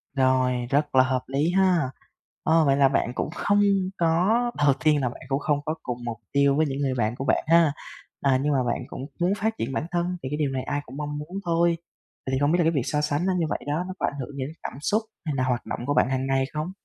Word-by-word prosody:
Rồi, 130 -2 +2
rất 145 +1 +1
là 130 - +7
hợp 130 0 -1
lý 145 +5 +1
ha! 180 -7 +3 0.5
Ơ, 160 0 +4
vậy 135 -1 +3
là 140 -1 +6
bạn 125 -3 0
cũng - - -2
không 205 +3 +1 0.4
có 165 +2 +2 0.3
đầu 145 -2 +4
tiên 150 -2 +4
là 125 - +1
bạn 120 - -11
cũng 135 +1 0
không 145 -1 0
có 155 - -1
cùng 125 -1 -3
mục 115 -1 -4
tiêu 140 0 +3
với 155 - +3
những 140 -1 -3
người 135 -2 0
bạn 110 0 0
của 135 - -5
bạn - - +2
ha. 165 -2 +5 0.5
À, 135 -2 +3
nhưng 150 - +1
mà 130 -2 +2
bạn 120 +1 -1
cũng - - -7 0.2
muốn 180 +3 +3
phát 220 +1 -1
triển 125 +4 -3
bản 140 - -1
thân 175 +1 -1
thì 130 - -3
cái 150 - -2
điều 145 -3 0
này 130 -1 -2
ai 145 0 -2
cũng 135 - -10
mong 150 0 -4
muốn 165 +6 -6
thôi. 170 0 +2 0.5
Vậy 130 - -3
thì 130 - +1
không 145 +1 +2
biết 175 - +3
là - - +4
cái 165 - +3
việc 140 -6 0
so 150 -1 0
sánh 150 +3 0
nó 190 - +2
như 170 - +1
vậy - - -1
đó 150 +4 0
nó 185 - -5
có - - +1
ảnh 145 - -3
hưởng 135 +2 -5
gì 130 - -2
đến 145 - -6
cảm - - -6
xúc, 215 +7 +1 0.2
hay 150 -3 -2
là 130 - +1
hoạt 125 -2 -1
động - - -4
của 145 - 0
bạn - - +3
hàng 130 0 -1
ngày 135 0 +2
không? 155 +4 -3
145 Hz, 280 wpm, -25 LUFS, 130-165 Hz, 0.5 s, là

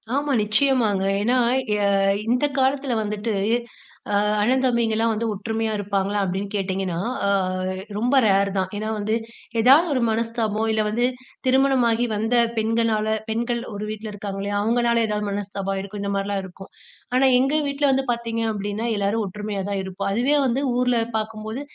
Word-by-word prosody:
ஆமா, 285 +1 0
நிச்சயமாங்க. 215 -3 +2 0.2
ஏன்னா, 245 +5 +2 0.4
எ - - 0 0.5
இந்த 250 +5 +2
காலத்தில 270 0 +1
வந்துட்டு, 210 +1 -2 0.8
அ - - +2 0.3
"அண்ணன் 255 +5 +2
தம்பிங்கலாம் 230 -2 +1
வந்து 225 +2 -2
ஒற்றுமையா 220 +2 -2
இருப்பாங்களா?" 200 0 -1
அப்டின்னு 195 +2 -3
கேட்டீங்கன்னா, 190 -3 -2 0.3
அ - - +2 0.7
ரொம்ப 245 +6 +1
ரேர் 200 -1 +3
தான். 190 0 0
ஏன்னா, 215 +1 -3
வந்து 215 +2 0 0.5
எதாவது 275 +9 +6
ஒரு 255 - +1
மனஸ்தாபம் 225 -1 -1
இல்ல 220 0 +1
வந்து 235 +3 +1 0.4
திருமணமாகி 255 -3 +3
வந்த 225 +3 0 0.2
பெண்கனால 220 -1 +1
பெண்கள் 235 +2 -1
ஒரு 205 +1 -5
வீட்ல 215 0 -6
இருக்காங்கலியா, 200 0 -4
அவுங்கனால 235 +1 +2
எதாவது 210 -1 -2
மனஸ்தாபம் 195 -1 -3
இருக்கும். 200 +1 -7
இந்த 200 - -2
மாரிலாம் 195 0 -1
இருக்கும். 190 +1 -12 0.4
ஆனா 260 +1 +4
எங்க 270 +3 +2
வீட்ல 280 +1 -1
வந்து 270 0 +1
பாத்தீங்க 230 -1 -3
அப்டின்னா, 205 +1 -3
எல்லாரும் 205 +2 0
ஒற்றுமையா 210 +1 -5
தான் 200 -1 -1
இருப்போம், 190 -1 -4
அதுவே 245 +7 +2
வந்து 260 +1 +1 0.2
ஊர்ல 250 -1 +2 0.2
பாக்கும்போது 220 +3 -4
220 Hz, 150 wpm, -23 LUFS, 205-240 Hz, 0.8 s, எதாவது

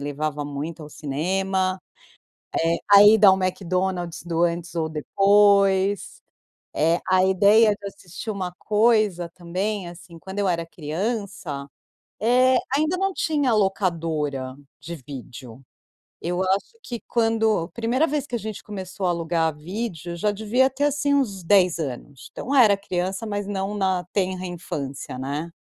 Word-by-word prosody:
levava 145 +1 -3
muito 145 +3 -5
ao - - -10
cinema. 185 +6 -1 0.8
Eh, 165 +1 +2
a 200 0 +10
ida 210 -1 +7
ao 190 - +8
McDonald's 185 -1 -2
do 170 0 0
antes 170 0 -2
ou 160 -1 0
depois. 195 +4 +3 0.5
Eh, 165 +3 +2
a 185 0 +4
ideia 205 +4 +5
de 200 -1 -8
assistir 195 +2 -7
uma 185 -3 -4
coisa 210 -5 +2
também 185 +3 -3
assim, 170 -1 -12
quando 190 +4 -7
eu 195 -2 +1
era 170 -1 -1
criança, 170 -3 -4 0.5
eh, 255 +3 +4 0.2
ainda 310 +5 +1
não 390 +1 0
tinha 290 -8 +1
locadora 165 -10 -1 0.2
de 170 +1 -7
vídeo. 130 -2 -10 0.6
Eu 175 +2 -2
acho 195 - -1
que 235 -2 -6
quando 225 -5 +2
a - - -11
primeira 235 - 0
vez 290 -2 -2
que 245 - -4
a 235 - -2
gente 215 0 -6
começou 190 -2 -5
a - - +2
alugar 165 -2 0
vídeo, 175 0 -5
já 210 +5 0
devia 220 +6 +2
ter 270 +2 -3
assim 290 0 +1
uns 200 -10 -1
10 180 -2 +4
anos. 135 -1 -6
Então 275 - -5
era 215 -6 +6
criança, 190 +2 -3
mas 205 -2 -3
não 195 0 -3
na 190 -3 0
tenra 185 -2 -1
infância, 140 -7 -6
né. 145 +5 -4
185 Hz, 150 wpm, -23 LUFS, 165-210 Hz, 0.8 s, a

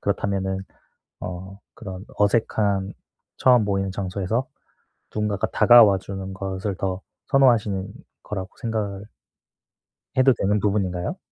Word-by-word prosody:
그렇다면은 95 -1 -1 0.6
어 95 +2 -7 0.2
그런 95 -4 -8
어색한 100 -2 +1 0.4
처음 125 -4 +5
모이는 95 -1 -1
장소에서 100 +6 -2 0.7
누군가가 105 -2 0
다가와 110 -3 +7
주는 95 0 -7
것을 95 0 -4
더 95 -1 -2 0.3
선호하시는 110 -8 +3 0.3
거라고 95 -2 -5
생각 105 -4 -3 1.1
해도 130 0 +5
되는 100 +1 +1
부분인가요? 95 -4 -1
100 Hz, 270 characters per minute, -23 LUFS, 95-105 Hz, 1.1 s, 다가와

